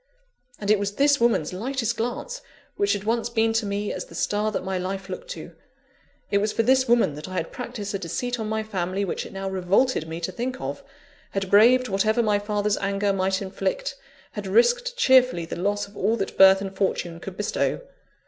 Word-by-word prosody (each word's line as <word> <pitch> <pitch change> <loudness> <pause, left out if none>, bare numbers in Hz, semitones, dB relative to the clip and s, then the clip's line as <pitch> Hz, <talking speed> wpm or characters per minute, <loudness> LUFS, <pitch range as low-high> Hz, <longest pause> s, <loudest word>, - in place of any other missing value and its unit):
And 205 0 0
it 215 - +4
was 200 0 -2
this 285 0 +4
woman's 225 -9 +2
lightest 235 +3 -2
glance 245 - -4 0.3
which 200 0 +2
had 200 -1 -3
once 230 +2 0
been 225 -1 +1
to 225 -2 0
me 205 +1 -2
as - - -5
the - - -13
star 210 +1 0
that 205 - -3
my 190 0 -3
life 190 +1 -4
looked - - -7
to! - - -9 0.8
it 200 - +3
was 210 +1 0
for 225 - +1
this 260 +2 +3
woman 235 -10 +3
that 150 +5 -8
I - - -7
had 165 -2 -2
practised 240 -5 -6
a 195 - -2
deceit 240 +8 -3
on 215 -1 -3
my 220 0 -1
family 195 -2 -2
which 180 - -3
it - - -13
now 195 0 -5
revolted 190 +1 +1
me 165 +1 -5
to 175 - -2
think 255 +5 -4
of; - - -5 0.5
had 195 -1 -2
braved 245 +5 +6
whatever 215 +4 +2
my 210 -2 +2
father's 205 0 0
anger 200 0 0
might 190 +1 0
inflict; - - -2 0.4
had - - -6
risked - - +2
cheerfully 255 - +4
the - - -6
loss 205 +3 -1
of 200 - -18
all 215 +4 +1
that 195 -4 -3
birth 190 0 +7
and 195 -1 -5
fortune 175 -3 -1
could 190 +2 -8
bestow! 210 - -1
205 Hz, 210 wpm, -24 LUFS, 195-240 Hz, 0.8 s, birth